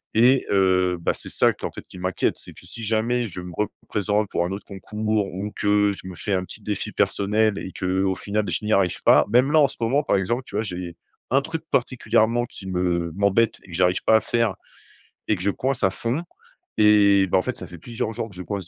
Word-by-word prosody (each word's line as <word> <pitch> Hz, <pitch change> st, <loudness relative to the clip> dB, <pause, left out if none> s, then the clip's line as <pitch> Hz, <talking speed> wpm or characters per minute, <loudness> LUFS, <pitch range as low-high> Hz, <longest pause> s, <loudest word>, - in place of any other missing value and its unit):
Et 125 Hz, +4 st, +5 dB
heu, 95 Hz, -2 st, +3 dB
bah -, -, +1 dB
c’est -, -, -8 dB
ça -, -, +3 dB
qui -, -, -8 dB
en -, -, -10 dB
fait -, -, -9 dB
m’inquiète. 90 Hz, 0 st, -1 dB
C’est -, -, -10 dB
que -, -, -15 dB
si 115 Hz, +5 st, -7 dB
jamais 115 Hz, +3 st, 0 dB
je 90 Hz, -1 st, -7 dB
me 90 Hz, 0 st, -8 dB
représente 105 Hz, 0 st, -1 dB
pour 85 Hz, -, 0 dB
un 90 Hz, -, -4 dB
autre 100 Hz, -, -6 dB
concours 105 Hz, +1 st, -2 dB
ou 100 Hz, +3 st, -4 dB
que 105 Hz, 0 st, +2 dB
je 95 Hz, -, -11 dB
me 90 Hz, -, -8 dB
fais 100 Hz, +4 st, -3 dB
un 90 Hz, -1 st, +1 dB
petit 110 Hz, -, -11 dB
défi 105 Hz, +1 st, -3 dB
personnel 100 Hz, +1 st, +1 dB
et 95 Hz, -, -6 dB
qu’au 95 Hz, 0 st, 0 dB
final 105 Hz, +2 st, -2 dB
je 85 Hz, -, -2 dB
n’y 110 Hz, -, -1 dB
arrive 95 Hz, -3 st, +1 dB
pas -, -, +6 dB
même 130 Hz, +4 st, +4 dB
là 160 Hz, -, +5 dB
en 140 Hz, -, +6 dB
ce -, -, -8 dB
moment 135 Hz, +6 st, +2 dB
par -, -, +1 dB
exemple 120 Hz, +7 st, -1 dB
tu -, -, -10 dB
vois 105 Hz, -, +1 dB
j’ai 90 Hz, -4 st, -6 dB, 0.4 s
un 135 Hz, -, +4 dB
truc 160 Hz, +2 st, -5 dB
particulièrement 120 Hz, -2 st, +1 dB
qui 95 Hz, -, -12 dB
me 90 Hz, -2 st, -1 dB
m’embête 100 Hz, +3 st, +2 dB
et -, -, -18 dB
que -, -, -9 dB
j’arrive 90 Hz, +1 st, +2 dB
pas 110 Hz, -, +5 dB
à 110 Hz, -, +5 dB
faire 115 Hz, -4 st, 0 dB, 0.7 s
et 110 Hz, -, +3 dB
que 90 Hz, -, -6 dB
je 100 Hz, -, +2 dB
coince 130 Hz, +4 st, -2 dB
à 95 Hz, -, +4 dB
fond. 120 Hz, -, -2 dB, 0.6 s
Et 100 Hz, -2 st, +6 dB
bah, 90 Hz, -, +2 dB
en -, -, +1 dB
fait -, -, -3 dB
ça -, -, -7 dB
fait 85 Hz, -, -11 dB
plusieurs 115 Hz, +2 st, -4 dB
jours 115 Hz, 0 st, -4 dB
que 95 Hz, -, -16 dB
je 90 Hz, -, -7 dB
coince 100 Hz, -3 st, -5 dB
105 Hz, 240 wpm, -23 LUFS, 95-115 Hz, 0.7 s, pas